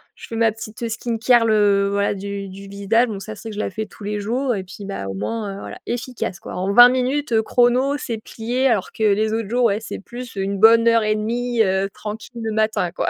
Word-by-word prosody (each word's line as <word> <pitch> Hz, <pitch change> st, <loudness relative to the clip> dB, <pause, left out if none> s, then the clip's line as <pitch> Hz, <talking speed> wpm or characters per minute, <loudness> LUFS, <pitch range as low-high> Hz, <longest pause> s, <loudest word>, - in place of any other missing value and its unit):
je -, -, -11 dB
fais 230 Hz, -, -6 dB
ma 225 Hz, -1 st, +3 dB
petite 225 Hz, +2 st, -6 dB
skincare 230 Hz, +1 st, +2 dB
le 205 Hz, -2 st, +3 dB
voilà 200 Hz, 0 st, +1 dB
du 200 Hz, 0 st, -5 dB
du 195 Hz, +1 st, -10 dB
visage 200 Hz, +5 st, +1 dB
donc 200 Hz, -3 st, -5 dB
ça 215 Hz, +1 st, -7 dB
c'est 225 Hz, -, -8 dB
que 210 Hz, -, -7 dB
je -, -, -5 dB
la -, -, -1 dB
fais 215 Hz, +3 st, -4 dB
tous 210 Hz, -, -14 dB
les 210 Hz, +1 st, -2 dB
jours 245 Hz, +5 st, -1 dB
et 190 Hz, -, -4 dB
puis, 190 Hz, +2 st, -10 dB
bah, 195 Hz, -, -5 dB
au 95 Hz, -, -4 dB
moins, 200 Hz, -, -3 dB
heu, -, -, -8 dB
voilà, -, -, -8 dB
efficace, 245 Hz, -5 st, -4 dB
quoi. -, -, -9 dB
En 190 Hz, +2 st, -1 dB
20 245 Hz, +2 st, +10 dB
minutes, 260 Hz, +2 st, -1 dB
heu, 220 Hz, -, +4 dB
chrono 250 Hz, +5 st, +2 dB
c'est 235 Hz, -4 st, -4 dB
plié, 240 Hz, +4 st, -2 dB
alors 220 Hz, -7 st, 0 dB
que 220 Hz, -, -4 dB
les 215 Hz, +1 st, +2 dB
autres 225 Hz, -2 st, -2 dB
jours, 245 Hz, +1 st, +2 dB
ouais 210 Hz, -1 st, +2 dB
c'est 220 Hz, -, -7 dB
plus 240 Hz, +3 st, -9 dB
1 195 Hz, 0 st, -2 dB
bonne 230 Hz, +1 st, +6 dB
heure 230 Hz, -1 st, +4 dB
et 215 Hz, 0 st, +1 dB
1/2, 235 Hz, +2 st, -1 dB
heu, 190 Hz, 0 st, 0 dB
tranquille 220 Hz, +3 st, -7 dB
le 225 Hz, -1 st, -2 dB
matin 215 Hz, -5 st, 0 dB
quoi. -, -, -1 dB
220 Hz, 250 wpm, -21 LUFS, 200-235 Hz, -, 20